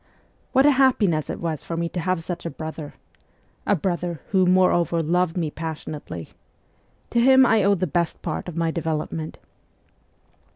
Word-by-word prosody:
What 265 Hz, +1 st, +4 dB
a 295 Hz, -, +7 dB
happiness 230 Hz, -, +2 dB
it -, -, -4 dB
was 160 Hz, -3 st, -3 dB
for 165 Hz, -, -5 dB
me 170 Hz, 0 st, 0 dB
to 180 Hz, -, -4 dB
have 180 Hz, 0 st, -1 dB
such 175 Hz, 0 st, -5 dB
a 170 Hz, -, -3 dB
brother! 160 Hz, -2 st, -7 dB, 0.7 s
a 205 Hz, -, +4 dB
brother 175 Hz, -1 st, -2 dB
who, 190 Hz, -2 st, +3 dB
more 185 Hz, 0 st, +5 dB
over, 170 Hz, -1 st, +1 dB
loved 175 Hz, +2 st, +1 dB
me 160 Hz, -4 st, -1 dB
passionately. 155 Hz, -, -6 dB, 0.8 s
To 235 Hz, -, +2 dB
him 260 Hz, +2 st, +6 dB
I 225 Hz, -3 st, +4 dB
owe 200 Hz, +1 st, +4 dB
the 185 Hz, -, -1 dB
best 170 Hz, +1 st, -2 dB
part -, -, -3 dB
of 170 Hz, -2 st, -6 dB
my 165 Hz, -1 st, +1 dB
development. 160 Hz, -1 st, -3 dB
170 Hz, 170 wpm, -23 LUFS, 160-185 Hz, 0.8 s, a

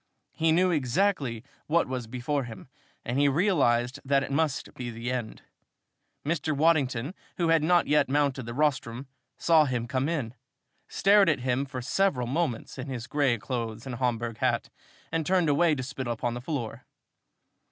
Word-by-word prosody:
He 160 Hz, 0 st, +1 dB
knew 180 Hz, +3 st, +3 dB
exactly 140 Hz, -, 0 dB, 0.2 s
what 170 Hz, +2 st, +2 dB
was 125 Hz, -3 st, -4 dB
before 130 Hz, +3 st, -2 dB
him 115 Hz, +2 st, -10 dB, 0.4 s
and 125 Hz, +3 st, -1 dB
he 145 Hz, -, +4 dB
realized 135 Hz, -, +2 dB
that 140 Hz, 0 st, +2 dB
it -, -, -5 dB
must 150 Hz, -1 st, -1 dB
be 125 Hz, -1 st, -5 dB
the 115 Hz, +2 st, -4 dB
end. 120 Hz, -4 st, -4 dB, 0.8 s
Mr. 155 Hz, -1 st, -1 dB
Waddington, 145 Hz, -3 st, +2 dB, 0.2 s
who 170 Hz, -2 st, +1 dB
had 165 Hz, -1 st, +4 dB
not 175 Hz, +2 st, +4 dB
yet 150 Hz, -2 st, +3 dB
mounted 140 Hz, -3 st, 0 dB
the 120 Hz, -, -5 dB
rostrum, 135 Hz, -4 st, 0 dB, 0.3 s
saw 160 Hz, -2 st, +4 dB
him 125 Hz, -4 st, -1 dB
come 130 Hz, +3 st, -1 dB
in, 135 Hz, -9 st, -2 dB, 0.5 s
stared 200 Hz, -1 st, +4 dB
at 150 Hz, -5 st, +1 dB
him 130 Hz, +2 st, 0 dB
for 130 Hz, -2 st, -6 dB
several 140 Hz, -3 st, +1 dB
moments 130 Hz, -2 st, -2 dB
in 130 Hz, -, -5 dB
his 125 Hz, -3 st, -5 dB
gray 140 Hz, -4 st, +1 dB
clothes 115 Hz, 0 st, -4 dB
and 130 Hz, -, -5 dB
Homburg 120 Hz, -2 st, -2 dB
hat, -, -, 0 dB, 0.4 s
and 165 Hz, 0 st, 0 dB
turned 180 Hz, -1 st, +2 dB
away 155 Hz, +2 st, +3 dB
to 130 Hz, -, -4 dB
spit 130 Hz, 0 st, -5 dB
upon 120 Hz, +1 st, -2 dB
the 120 Hz, -, -5 dB
floor. 125 Hz, -4 st, -4 dB
135 Hz, 170 wpm, -27 LUFS, 120-155 Hz, 0.8 s, he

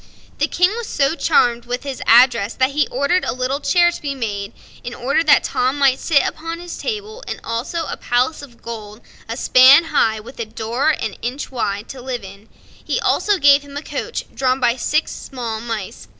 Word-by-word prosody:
The -, -, +2 dB
King 360 Hz, +2 st, +2 dB
was 470 Hz, -2 st, -5 dB
so 275 Hz, +1 st, +1 dB
charmed 240 Hz, -8 st, +2 dB
with 245 Hz, +1 st, -4 dB
his 275 Hz, -2 st, -6 dB
address 235 Hz, -3 st, +5 dB
that 260 Hz, +1 st, +1 dB
he 300 Hz, +2 st, +1 dB
ordered 280 Hz, +8 st, 0 dB
a -, -, -2 dB
little 255 Hz, +2 st, -2 dB
chair 345 Hz, +3 st, +3 dB
to -, -, -8 dB
be 280 Hz, -2 st, -3 dB
made, 205 Hz, -5 st, -4 dB, 0.3 s
in 240 Hz, 0 st, -6 dB
order 275 Hz, +6 st, 0 dB
that 305 Hz, -3 st, +5 dB
Tom 255 Hz, +3 st, 0 dB
might 275 Hz, -2 st, +3 dB
sit 300 Hz, -5 st, +3 dB
upon 330 Hz, +1 st, -5 dB
his 350 Hz, 0 st, -8 dB
table, 435 Hz, +1 st, -5 dB
and -, -, -5 dB
also 255 Hz, +9 st, -3 dB
a -, -, -4 dB
palace 250 Hz, +6 st, 0 dB
of 245 Hz, -5 st, -14 dB
gold, 215 Hz, -1 st, -8 dB, 0.3 s
a 230 Hz, -, -4 dB
span 265 Hz, +5 st, +7 dB
high, 220 Hz, -1 st, +2 dB
with 230 Hz, +4 st, -13 dB
a 230 Hz, -, -2 dB
door 230 Hz, +6 st, -1 dB
an 310 Hz, -, -2 dB
inch 255 Hz, +5 st, -4 dB
wide, 205 Hz, -4 st, -3 dB
to 265 Hz, -, -8 dB
live 250 Hz, -3 st, -5 dB
in. 200 Hz, +3 st, -13 dB, 0.3 s
He -, -, -1 dB
also 415 Hz, -1 st, +1 dB
gave 285 Hz, -2 st, +5 dB
him 285 Hz, 0 st, -10 dB
a 290 Hz, -, -5 dB
coach, 480 Hz, -, -5 dB
drawn 260 Hz, 0 st, 0 dB
by 240 Hz, -2 st, +2 dB
six 305 Hz, +5 st, 0 dB
small 235 Hz, -5 st, -6 dB
mice. 220 Hz, -, -6 dB
260 Hz, 205 wpm, -19 LUFS, 235-295 Hz, 0.3 s, span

